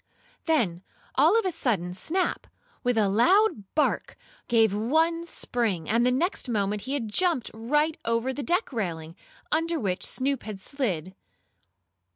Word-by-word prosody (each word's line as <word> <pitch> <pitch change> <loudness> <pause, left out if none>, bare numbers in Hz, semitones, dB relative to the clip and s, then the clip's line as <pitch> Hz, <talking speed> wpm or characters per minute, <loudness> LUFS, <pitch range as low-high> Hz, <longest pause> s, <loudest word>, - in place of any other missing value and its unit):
Then, 225 - +1 0.3
all 320 +11 +5
of 455 - +1
a 370 - +1
sudden, 210 - -1
Snap, 345 - -1 0.4
with 245 -2 +1
a 210 -2 +4
loud 335 - +3
bark, 305 - 0 0.3
gave 225 -4 +4
one 320 +10 +1
spring, 215 - -2
and 230 +2 +2
the 250 - +3
next 290 +1 -1
moment 205 -2 0
he 265 - -4
had 240 -6 -2
jumped 320 - +1
right 295 +8 +1
over 230 +3 0
the 285 - -4
deck 345 +2 0
railing, 165 -7 -4 0.4
under 330 +1 +1
which 190 -6 -2
Snoop 270 0 -1
had 210 -3 -7
slid. 190 - -3
245 Hz, 150 wpm, -26 LUFS, 205-315 Hz, 0.4 s, all